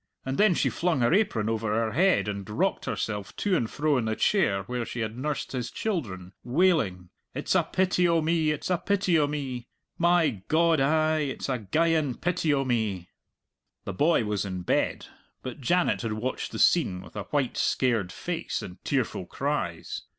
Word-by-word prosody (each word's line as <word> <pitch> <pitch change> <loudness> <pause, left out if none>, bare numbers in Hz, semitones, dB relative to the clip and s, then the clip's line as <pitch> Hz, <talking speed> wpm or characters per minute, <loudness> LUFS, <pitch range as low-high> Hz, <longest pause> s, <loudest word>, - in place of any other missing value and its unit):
And 135 0 -3
then 205 -4 +5
she - - +1
flung 170 -6 0
her 120 +6 +3
apron 185 - +2
over 110 -1 -1
her 115 -1 0
head 180 - +3
and 100 -1 -4
rocked 105 - 0
herself 105 -2 -3
to 200 -3 +1
and 115 -9 0
fro 150 -2 +1
in 115 - -2
the 110 0 -1
chair 100 - +2
where 125 +4 -3
she 120 +1 -5
had 110 0 -3
nursed 145 +3 -3
his 125 -3 -3
children, 100 - -4
wailing, 120 - +1 0.2
"It's - - -1
a - - +5
pity 180 -1 +1
o' 170 -1 +3
me, 160 0 +1
it's 150 +4 -2
a 175 - +2
pity 190 -4 +2
o' 145 - +3
me! 130 -5 -4 0.3
My 170 - +3
God, 165 0 +3
ay, 155 +2 +2
it's 135 0 -4
a 130 -2 0
geyan 155 - +1
pity 175 -3 0
o' 135 -1 +1
me!" 110 -8 -1 0.8
The 100 - -4
boy 150 - +3
was 105 -1 -1
in 95 -2 -5
bed, - - 0 0.4
but 130 +2 -7
Janet 175 +8 +2
had 115 -2 -2
watched 115 +4 -3
the - - -5
scene 95 - +3
with 90 - -15
a 105 - -4
white, 140 -4 -1
scared 115 -8 +1
face - - -4
and 90 - -10
tearful 125 -9 -1
cries. 135 - -3
130 Hz, 185 wpm, -27 LUFS, 110-165 Hz, 0.8 s, then